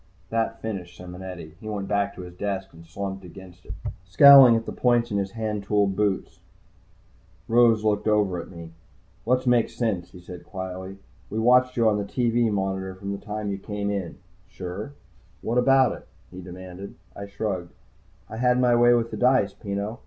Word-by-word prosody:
That 115 0 -2
finished 90 -6 -5
Simonetti. 90 -3 -9
He 110 - -8
went 100 -2 -4
back 100 -1 0
to - - -8
his 90 0 -10
desk 95 0 -4
and 85 0 -15
slumped 95 +2 -5
against 90 0 -13
it, - - -7 0.3
scowling 130 +5 +8
at 115 0 -1
the - - -5
points 120 -2 +1
of 100 - 0
his 95 -1 -3
handtooled 105 -3 -1
boots. 100 -1 -1 1.1
Rose 115 -2 +4
looked 105 0 0
over 100 -5 +1
at - - -12
me. 85 -2 -10 0.6
"Let's 125 +1 +2
make 120 -2 +3
sense," 100 -8 -2
he 90 - -13
said 90 0 -10
quietly. 95 0 -7 0.3
"We 105 - -5
watched 125 +3 +3
you 115 -1 +3
on 105 -1 +2
the - - -2
TV 120 +1 +1
monitor 95 -1 -2
from 100 +1 -6
the 100 - -6
time 105 -1 -4
you 100 - -4
came 105 0 -3
in." 95 -4 -4 0.3
"Sure," 90 -1 -7
I 105 +3 -5
said. - - -14 0.5
"What 115 +2 -1
about 135 0 +4
it?" - - -9 0.2
he 90 0 -9
demanded. 90 +1 -10 0.2
I 100 - -7
shrugged. 100 -3 -4 0.6
"I 110 - -8
had 125 +1 +2
my 125 -1 +4
way 120 0 +5
with 115 -1 -1
the - - -5
dice, 125 -6 +3
Peno. 100 +3 -5
100 Hz, 190 wpm, -25 LUFS, 95-115 Hz, 1.1 s, scowling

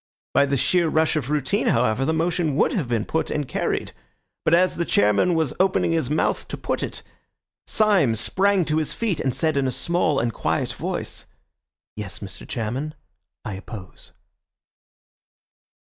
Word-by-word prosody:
By 140 - +4
the 140 0 +1
sheer 170 +5 +2
rush 160 0 +2
of 145 -4 -2
routine, 150 - 0
however, 125 0 +2
the 160 - +1
motion 165 -2 0
would - - +2
have 160 -10 -1
been 115 -3 0
put 160 - -1
and 150 -3 -2
carried. - - -2 0.5
But 165 - +4
as 185 +1 +2
the 170 - +1
chairman 105 - +3
was 160 -4 0
opening 185 -2 +2
his 160 -6 0
mouth 150 - 0
to - - -5
put - - -2
it, - - -5 0.6
Syme 195 - +3
sprang 190 - +2
to 155 0 0
his 155 -2 -1
feet 215 -8 -1
and 130 - 0
said 155 +3 +1
in 135 -1 +2
a - - 0
small 155 +4 0
and 115 -1 -1
quiet - - -1
voice— - - -4 0.7
"Yes, 105 -2 -6
Mr. 100 -2 -8
Chairman, 130 +7 -3 0.5
I 105 - -4
oppose." 95 0 -9
150 Hz, 165 wpm, -23 LUFS, 120-170 Hz, 0.7 s, By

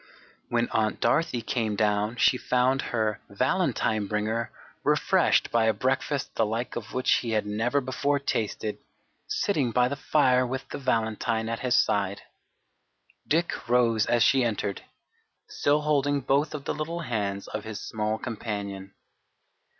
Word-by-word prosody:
When 120 0 +1
Aunt 110 -1 0
Dorothy 120 0 +1
came 110 -4 -1
down 105 +1 +1
she 125 - +4
found 125 +1 +1
her 110 -3 -1
"valentine" 110 -2 0
bringer 110 +3 -1 0.3
refreshed - - +3
by 115 -1 +3
a 110 -1 +2
breakfast 135 +4 -1
the - - +1
like 115 +3 -2
of 120 0 -6
which 130 +1 +3
he 120 - -3
had 105 -1 +1
never 115 +7 0
before 140 +2 0
tasted, 110 -5 -2 0.5
sitting 200 - 0
by 125 +1 +3
the 140 - -2
fire 130 -3 +3
with 130 +2 -4
the - - -5
"valentine" 110 -3 0
at 115 - -2
his 125 -1 +2
side. 100 -1 +1 1.0
Dick 165 -5 -1
rose 115 -3 +3
as 120 -1 +3
she 135 +1 +4
entered, 105 -4 -2 0.7
still 145 +1 +1
holding 145 -1 +1
both 140 +4 +1
of 140 - -7
the - - -1
little 165 +3 -4
hands 100 -8 -3
of 110 - -4
his 110 -2 -6
small 110 0 -2
companion. 100 -5 -5
120 Hz, 150 wpm, -27 LUFS, 110-135 Hz, 1.0 s, she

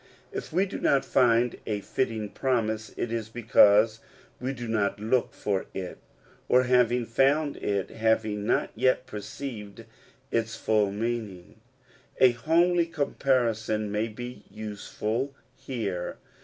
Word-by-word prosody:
If - - -6
we 185 +4 +2
do 200 - -6
not 140 - +2
find 120 -1 +3
a 105 -2 -1
fitting 110 -1 -2
promise, 110 -5 -1
it 120 - -2
is 115 -2 -3
because 110 -1 +5 0.4
we 130 +2 -2
do 120 -3 -6
not 105 -3 0
look 115 +4 +1
for 100 -2 -2
it; 90 -2 -5 0.5
or 125 +1 +5
having 125 -1 +3
found 140 +5 +2
it, 100 -2 -2
have 110 0 +2
not 105 -1 0
yet 130 +2 +2
perceived 105 -1 -7 0.5
its 115 -1 0
full 105 -2 +1
meaning. 110 -2 -4 0.6
A 130 -1 +7
homely 170 +8 +2
comparison 115 -8 0
may 105 +2 0
be 120 0 -8
useful 110 +5 -4 0.2
here. 100 -9 -4
115 Hz, 130 wpm, -27 LUFS, 105-130 Hz, 0.6 s, A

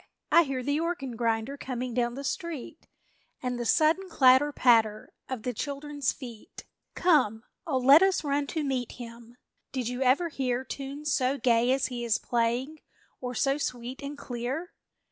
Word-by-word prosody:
I 340 - +7
hear 265 -2 -3
the 285 +3 0
organ 320 -7 -3
grinder 230 +3 -1
Coming 255 -2 -4
down 240 0 0
the 275 - -6
street, 320 +1 -5 0.5
And 250 -1 -3
the 240 - -2
sudden 325 +8 +3
clatter 270 -1 +5
patter 225 -6 +3 0.2
Of 255 -4 -4
the 250 - -2
children's 285 +2 -2
feet! 240 -5 -10 0.3
Come, 255 - +3 0.2
oh, 280 -5 +1
let 270 +5 +7
us 385 -2 +3
run 285 -1 0
to 315 +1 -2
meet 260 -4 -2
him! 235 0 -11 0.3
Did 250 -3 -2
you 250 +1 -4
ever 270 +7 +3
hear 260 -4 -1
Tunes 280 +3 -4
so 260 +1 +1
gay 240 -1 +3
as 270 0 +2
he 240 -1 -4
is 230 -2 +2
playing, 245 +6 -1 0.4
Or 250 -1 -5
so 275 +4 +1
sweet 250 0 -4
and 285 +1 -6
clear? 260 +8 -5
260 Hz, 165 wpm, -28 LUFS, 240-285 Hz, 0.5 s, I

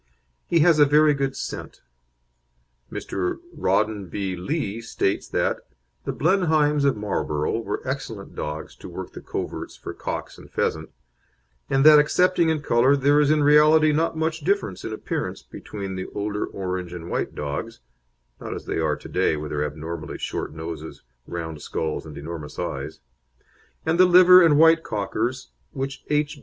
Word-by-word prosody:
He 170 -2 +3
has 165 -1 +5
a 145 - +8
very 150 +1 +5
good 135 -1 -2
scent. - - -6 1.1
Mr. 90 -2 -3 0.2
Rawdon 105 -2 0
B. 95 +1 -3
Lee 110 - -3
states 100 -3 -1
that - - 0 0.5
"the - - -1
Blenheims 155 -4 +2
of 140 -5 +2
Marlborough 100 -4 -1
were 105 +1 -5
excellent 115 -7 -5
dogs 75 +1 -5
to - - -10
work - - -7
the - - -9
coverts - - -5
for - - -7
cock - - -5
and - - -14
pheasant, 80 0 -2 0.8
and 135 +1 +2
that 155 -1 +10
excepting 170 +2 +3
in 155 -2 -1
colour 125 +3 +4
there 145 +2 +4
is 145 - +3
in 155 -1 +3
reality 155 +1 +6
not 160 +1 0
much 160 +1 -1
difference 165 - -1
in - - -4
appearance 110 - -4
between 100 -2 -7
the 95 0 -5
older 105 0 -2
orange 90 -2 -4
and 85 -1 -7
white - - -2
dogs 70 -3 -4 0.6
(not - - -5
as - - -8
they - - -2
are 80 -2 +1
to - - -11
day, 75 - +1
with 75 0 -6
their 75 0 -1
abnormally 75 +1 -5
short - - -4
noses, 80 0 -7 0.2
round 80 -3 -5
skulls, 80 0 -3
and 75 - -9
enormous 75 0 -7
eyes), 70 +1 -5 0.8
and 165 +2 +1
the 185 - +8
liver 180 +1 +8
and 160 -4 +5
white 165 +1 +6
Cockers 115 +3 -3 0.2
which 135 0 -4
H. 150 0 0
115 Hz, 165 wpm, -24 LUFS, -, 1.1 s, that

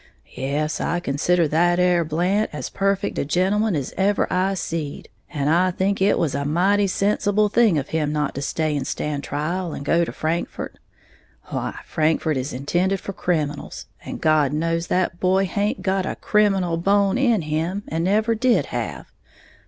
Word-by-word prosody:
"Yes, 145 +3 -2
I 175 +2 0
consider 170 +2 +1
that 175 +3 +3
'ere 180 -1 +3
Blant 180 +7 0
as - - -6
perfect 195 0 0
a - - +1
gentleman 190 +7 +1
as 140 -4 -3
ever 200 +1 +2
I 190 +2 +1
seed; 165 -5 -4 0.2
and 140 -1 -2
I 175 +4 +3
think 190 +2 -1
it 200 +2 +3
was 155 -5 0
a 140 +1 -1
mighty 190 +7 +2
sensible 205 +2 +1
thing 220 -6 +4
of 140 -1 -3
him 155 -2 0
not 150 -1 -1
to 140 - -5
stay 155 +1 -1
and 135 -2 -2
stand 145 -1 -3
trial 165 +4 -3
and 140 - -7
go 170 +3 +3
to - - -3
Frankfort. 165 +2 -3 0.7
Why, - - -3
Frankfort 155 0 +1
is 130 +3 -3
intended 175 +9 0
for 195 - -6
criminals, 150 -6 -2 0.2
and - - -6
God 155 -2 +3
knows 165 +2 -1
that 180 -1 0
boy 190 +1 +2
haint 200 0 -1
got 190 -1 0
a - - -3
criminal 195 -5 +1
bone 200 +5 +2
in 235 -9 +2
him, 165 +6 -2
and 165 +1 -2
never 215 +5 +2
did 240 +2 +2
have. - - -4
175 Hz, 175 wpm, -22 LUFS, 155-195 Hz, 0.7 s, thing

